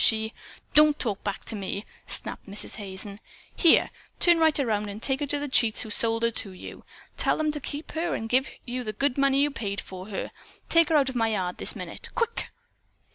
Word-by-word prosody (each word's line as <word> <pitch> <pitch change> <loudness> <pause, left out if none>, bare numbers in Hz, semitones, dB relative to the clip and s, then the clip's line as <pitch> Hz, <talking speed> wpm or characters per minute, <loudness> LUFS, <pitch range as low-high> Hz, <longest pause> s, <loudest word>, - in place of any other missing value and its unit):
She 220 0 +4 0.2
" - - -24
"Don't 300 0 +6
talk 210 -5 -3
back 200 -2 -4
to 225 - -4
me!" 200 0 -4 0.2
snapped - - 0
Mrs. 200 +2 -4
Hazen. 200 0 -5 0.4
"Here! 335 - +5 0.3
Turn 345 -1 +5
right 315 -2 +4
around 210 -6 0
and 200 +1 -6
take 265 +3 0
her 290 - -2
to 290 - +1
the 290 0 -3
cheats 230 -5 +3
who 220 - -8
sold 230 +1 0
her 230 - +3
to 200 -3 -4
you. 185 - -10 0.3
Tell - - +2
them 310 -1 +1
to 300 - -4
keep 290 +3 -6
her 335 +2 -1
and 225 - -4
give 260 +3 +2 0.2
you 250 +1 -3
the 215 -2 -4
good 275 +4 +1
money 275 0 +4
you 295 - +1
paid 205 -6 -3
for 185 0 -8
her. 205 - -4 0.4
Take 335 -1 +5
her 320 - +3
out 275 -3 +4
of 260 - -7
my 225 -2 +2
yard 185 -5 -2
this - - 0
minute! - - -7
Quick!" 470 -1 -1
235 Hz, 225 wpm, -27 LUFS, 210-290 Hz, 0.4 s, Don't